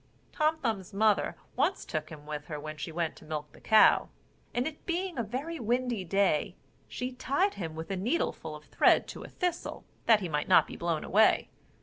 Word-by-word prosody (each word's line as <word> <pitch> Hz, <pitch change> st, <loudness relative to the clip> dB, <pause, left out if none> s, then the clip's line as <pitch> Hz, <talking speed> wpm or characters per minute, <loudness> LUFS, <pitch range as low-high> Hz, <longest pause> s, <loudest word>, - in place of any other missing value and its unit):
Tom 310 Hz, 0 st, +1 dB
Thumb's 210 Hz, -, -3 dB
mother 215 Hz, 0 st, +2 dB, 0.2 s
once 300 Hz, +9 st, +1 dB
took 155 Hz, -1 st, -3 dB
him 150 Hz, -2 st, -11 dB
with 150 Hz, -1 st, -5 dB
her 150 Hz, -2 st, -5 dB
when 155 Hz, +1 st, -6 dB
she 155 Hz, +2 st, -6 dB
went 165 Hz, -1 st, -2 dB
to -, -, -14 dB
milk 150 Hz, -1 st, -5 dB
the -, -, -17 dB
cow; 220 Hz, 0 st, +5 dB, 0.4 s
and 245 Hz, +1 st, 0 dB
it 305 Hz, 0 st, -6 dB
being 355 Hz, +1 st, -1 dB
a 240 Hz, -, 0 dB
very 275 Hz, +10 st, -4 dB
windy 240 Hz, -2 st, 0 dB
day, 190 Hz, -1 st, +1 dB, 0.3 s
she 250 Hz, +1 st, -4 dB
tied 280 Hz, +10 st, 0 dB
him 165 Hz, -4 st, -5 dB
with 160 Hz, +4 st, -6 dB
a -, -, 0 dB
needleful 240 Hz, -, -1 dB
of -, -, -12 dB
thread -, -, +4 dB
to -, -, -7 dB
a -, -, -8 dB
thistle, 360 Hz, -2 st, -3 dB, 0.2 s
that 220 Hz, -2 st, +6 dB
he 185 Hz, -, -2 dB
might 150 Hz, -2 st, -1 dB
not 185 Hz, -, +6 dB
be -, -, -9 dB
blown 170 Hz, -2 st, -1 dB
away. 215 Hz, +3 st, +3 dB
205 Hz, 205 wpm, -30 LUFS, 160-255 Hz, 0.4 s, that